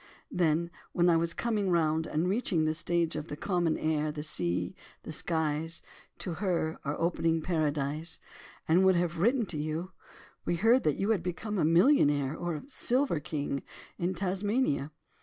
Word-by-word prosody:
Then, 170 0 +1 0.2
when 175 0 +4
I - - +4
was 170 +1 0
coming 215 -5 0
round, 160 -2 +2
and 160 +4 0
reaching 190 -5 +1
the 155 - +1
stage 165 +1 0
of 155 0 -4
'the 145 - -6
common 175 -3 0
air, 155 -1 0
the 150 0 -5
sea, 90 - -1 0.3
the - - -6
skies, 160 0 -1 0.3
to 180 - -4
"her" 170 -5 0
are 145 0 -3
opening 165 -1 +1
Paradise,' 155 -1 -1 0.5
and 175 +4 +5
would 190 -1 +5
have 170 -1 0
written 235 +5 +3
to 160 -5 -5
you, 155 +5 -3 0.5
we 175 - 0
heard 225 +9 +4
that 150 - +2
you 200 +3 +1
had 205 -6 +2
become 195 +4 -3
a - - +3
millionaire 155 - +4
or 175 -1 -3
a 150 - -6
'silver 260 - +1
king' 145 -2 -3 0.4
in 180 +2 0
Tasmania. 190 - 0
165 Hz, 170 wpm, -30 LUFS, 155-185 Hz, 0.5 s, and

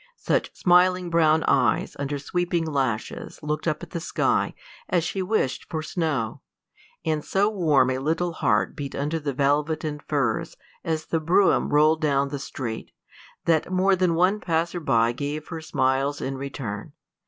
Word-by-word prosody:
Such - - -1
smiling 180 0 +3
brown 160 -1 +4
eyes 130 -3 +2
under 140 +1 -2
sweeping 175 +3 -1
lashes 135 -8 -2
looked 150 +2 -2
up 155 +1 -1
at 170 - -9
the 170 - -3
sky 165 - 0 0.3
as 175 -3 +2
she 190 +3 -2
wished 185 -9 -1
for 155 -1 -3
snow, 155 -9 -2 0.6
and 155 -2 0
so 200 +2 +1
warm 150 -10 +3
a 130 - -1
little 165 +5 -1
heart 105 -9 +1
beat 140 -1 -5
under 150 +4 -1
the 145 -2 -2
velvet 145 +4 +1
and 150 -1 -4
furs 140 -8 -1 0.3
as 160 -1 -2
the 165 - 0
brougham 175 +5 +3
rolled 155 +2 +4
down 140 -2 +2
the 140 0 -4
street, 120 -4 -5 0.5
that 165 +1 +2
more 190 +1 +3
than 180 -2 +1
one 185 +5 +3
passer 170 -1 -1
by 115 -7 +2
gave 145 +4 -4
her 165 -2 -5
smiles 135 -1 0
in 135 - -3
return. 130 -6 -6
155 Hz, 165 wpm, -25 LUFS, 140-170 Hz, 0.6 s, brown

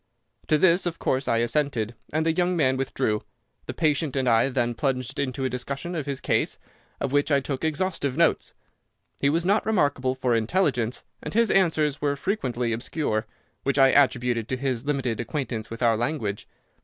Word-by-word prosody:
"To 155 - +4
this, 175 +2 +4
of 170 - -3
course, 130 +1 -1
I 115 - +2
assented, 120 -2 0 0.2
and 155 +1 0
the 165 - +3
young 180 +1 +1
man 130 -4 +3
withdrew. 130 -5 -1 0.5
The - - -5
patient 150 -3 +1
and 130 -2 0
I 115 +2 +4
then 120 -2 0
plunged 130 +2 -2
into 135 -1 -2
a - - +3
discussion 140 +7 -4
of 155 -4 -3
his 140 -2 -3
case, - - 0 0.4
of 140 - -2
which 145 +1 +2
I 140 - +5
took 135 0 -4
exhaustive 155 -4 -1
notes. 170 -1 +2 0.6
He 140 - +3
was 165 +4 +1
not 200 +3 +3
remarkable 145 -11 +1
for 130 -2 0
intelligence, 120 - 0 0.2
and - - -6
his 230 0 +3
answers 155 -6 +2
were 145 -1 +1
frequently 125 - -1
obscure, 110 -2 -2 0.3
which 140 +1 0
I 135 -1 +7
attributed 125 -4 +2
to 130 - -1
his 130 -2 -2
limited 135 -6 -1
acquaintance 120 -2 -3
with 115 +2 -5
our 115 -1 +4
language. 115 -4 -2
135 Hz, 180 wpm, -25 LUFS, 120-155 Hz, 0.6 s, I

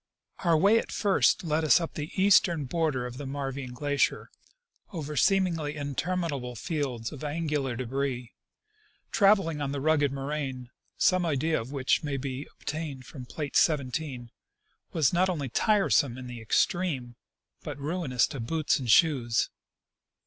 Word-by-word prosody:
Our 170 -3 +3
way 200 +7 +5
at - - -6
first 200 -3 +2
led 160 -1 0 0.2
up 165 - -4
the 150 +1 -5
eastern 185 -5 +4
border 150 -3 -1
of 125 0 -7
the 145 - -5
Marvine 135 -2 -4
glacier, 145 +1 0 0.6
over 150 -5 -5
seemingly 165 -4 +2
interminable 145 -3 -3
fields 125 -3 -3
of 150 -1 -9
angular 150 -4 -1
debris. 130 0 -3 0.8
Traveling 195 -8 +3
on 140 -1 -2
the 140 - -2
rugged 145 -1 +2
nioraine, 135 -2 -4 0.3
some 185 -1 +3
idea 160 -1 0
of 120 +4 -9
which 135 -2 +1
may 145 -2 -2
be 135 +1 -5
obtained 150 -4 -5
from 125 -3 -10
plate 145 0 -5
17, 135 -4 0 0.6
was 155 -3 +2
not 185 +2 +3
only 145 -7 -2
tiresome 145 - +2
in 130 - -8
the 120 -2 -8
extreme, 135 - 0 0.5
but 150 -2 -6
ruinous 145 -5 0
to 135 - -7
boots 155 +7 0
and 125 -3 -5
shoes. 120 -5 +3
145 Hz, 140 wpm, -28 LUFS, 130-165 Hz, 0.8 s, way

